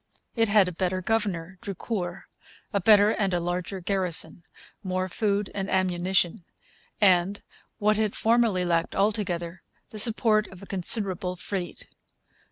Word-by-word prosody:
It 225 -2 +2
had 200 -2 +5
a - - -3
better 185 +1 -1
governor, 185 -4 -2
Drucour, 190 -2 -4 0.5
a 200 - +1
better 210 +1 +6
and 195 -5 0
a - - +1
larger 180 +2 -3
garrison, 180 -2 0 0.4
more 185 -1 -2
food 200 +1 -1
and 195 0 -3
ammunition, 180 -1 +1 0.6
and, 190 0 +3 0.3
what 210 0 +2
it 215 -2 0
formerly 225 -5 +2
lacked 170 -1 0
altogether, 190 -4 -1 0.3
the 215 - -5
support 215 -1 +3
of 190 0 -13
a - - -8
considerable 185 -1 +1
fleet. 180 -1 -6
190 Hz, 135 wpm, -26 LUFS, 180-210 Hz, 0.6 s, better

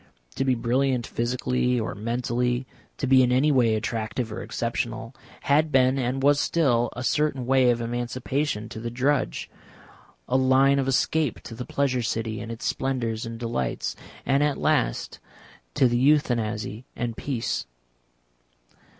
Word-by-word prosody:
To - - -1
be 130 -1 +2
brilliant 125 +1 +1
physically 125 +1 0
or 110 - -3
mentally, 120 +3 -1 0.3
to - - -2
be 130 0 +6
in 125 -1 +3
any 135 +4 +3
way 120 -5 +3
attractive 110 +1 -3
or - - -5
exceptional, 115 +1 -3 0.3
had 150 +2 +2
been 130 0 +4
and 130 +1 -1
was 145 0 +5
still 120 -9 +2
a 125 - -5
certain 150 -2 0
way 130 0 +4
of 120 -1 +1
emancipation 120 +1 -2
to - - -7
the 115 +1 -4
drudge, 130 +4 0 0.8
a 130 - +2
line 135 +1 +4
of 135 - 0
escape 140 +1 +1
to - - -9
the 125 +2 -6
Pleasure 135 -3 0
City 110 -2 -2
and 115 - -6
its 115 - -7
splendours 120 -4 -1
and 115 0 -6
delights, 115 - -2 0.3
and 140 +1 +2
at 145 -1 +1
last - - 0 0.6
to 130 - +5
the 120 0 +1
Euthanasy 120 -6 +1
and 120 -2 -3
peace. 120 - -3
125 Hz, 150 wpm, -25 LUFS, 115-135 Hz, 0.8 s, be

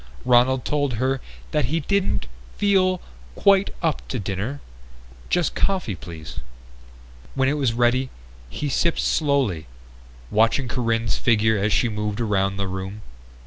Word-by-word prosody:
Ronald 125 +1 +4
told 145 -3 0
her 130 +3 0 0.3
that - - +2
he 160 +7 0
didn't 200 +5 0 0.3
feel 185 -3 +3 0.3
"quite 200 -1 +4
up 160 -3 -1
to 130 - -3
dinner. 105 +7 -3 0.7
Just 175 -2 +1
coffee, 185 - 0
please." 80 -3 -8 1.0
When 135 -1 +2
it 140 - +2
was 135 -6 +1
ready 120 +2 +2 0.4
he 145 - -3
sipped 165 +4 +1
slowly, 135 - +1 0.6
watching 115 +4 +3
Corinne's 115 -3 0
figure 110 -2 +3
as 105 +2 +1
she 120 - +3
moved 105 -1 -3
around 100 -3 +1
the 100 -1 -1
room. 95 +3 -5
120 Hz, 135 wpm, -23 LUFS, 105-145 Hz, 1.0 s, Ronald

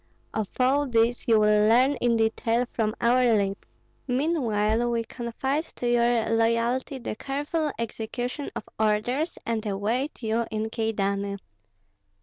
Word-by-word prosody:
Of 215 -3 -2
all 275 +3 +3
this 235 +1 +1
you 225 -2 +5
will 210 0 +4
learn 255 +5 +5
in 235 -1 +2
detail 225 +2 +1
from 215 -1 0
our 245 +2 +3
lips; 200 -1 -1 0.4
meanwhile 240 -5 +1
we 230 -1 0
confide 265 +6 -3
to 245 - -3
your 240 -1 +2
loyalty 230 +4 +1
the 235 -3 -5
careful 290 +5 -2
execution 240 +4 -4
of - - -4 0.2
orders, 220 +9 0
and 225 -2 -1
await 225 +7 -2
you 225 +1 0
in 220 0 -3
Kyedani. 200 -3 -1
230 Hz, 135 wpm, -26 LUFS, 220-255 Hz, 0.4 s, you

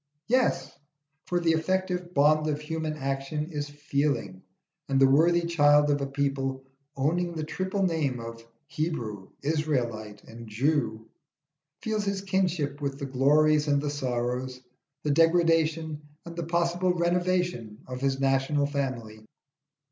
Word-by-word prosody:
Yes, 255 +2 +1 0.6
for 175 - +1
the 170 -1 +2
effective 180 +2 -1
bond 155 0 +3
of 150 -1 -1
human 155 0 -4
action 135 +3 -3
is 145 -2 -4
feeling, 145 -9 -2 0.5
and 135 -1 +2
the 135 - +7
worthy 165 +6 +4
child 150 -3 +4
of 145 0 +1
a 140 - -1
people 135 -1 -2 0.3
owning 170 +5 0
the 155 - -3
triple 190 +5 -2
name 155 -8 0
of 115 0 -8 0.2
Hebrew, 115 - -4
Israelite, 120 -9 -2
and 115 0 -11
Jew, 110 -1 0 0.8
feels 215 -1 -1
his 200 -1 -1
kinship 180 -7 -1
with 140 -1 -2
the 140 - -4
glories 150 +3 +3
and 145 -1 +3
the 145 0 -2
sorrows, 125 -1 -2 0.4
the 150 - +1
degradation 165 -1 +2 0.2
and 170 -1 -8
the 170 -1 -4
possible 170 +1 +1
renovation 175 -10 0
of 125 0 -6
his 135 -1 0
national 135 +2 +2
family. 130 -7 -4
150 Hz, 135 wpm, -27 LUFS, 135-170 Hz, 0.8 s, the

